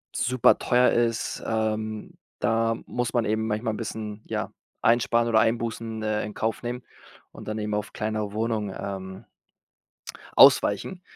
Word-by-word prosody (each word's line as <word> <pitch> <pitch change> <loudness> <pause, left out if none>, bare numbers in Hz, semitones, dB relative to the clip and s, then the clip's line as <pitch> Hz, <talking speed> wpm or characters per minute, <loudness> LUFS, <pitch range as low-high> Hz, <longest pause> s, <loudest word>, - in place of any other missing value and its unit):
superteuer 125 0 +3
ist, 115 -1 0
ähm, 110 -1 -2 0.3
da 115 0 +1
muss 125 0 -2
man 120 -2 +1
eben 110 +1 0
manchmal 110 +1 -1
'n - - -5
bisschen, 110 -1 -6
ja, - - -3 0.3
einsparen 115 0 +3
oder 110 -1 +4
Einbußen, 115 -1 -1
äh, 110 0 0
in 105 - -7
Kauf 110 +3 -2
nehmen 125 +1 -4 0.5
und - - -12
dann 110 0 -3
eben 105 0 -3
auf 105 0 -3
kleinere 110 -1 -3
Wohnungen, 110 -2 -2
ähm 95 +1 -6 1.1
ausweichen. 185 -1 +5
110 Hz, 140 wpm, -26 LUFS, 105-115 Hz, 1.1 s, ausweichen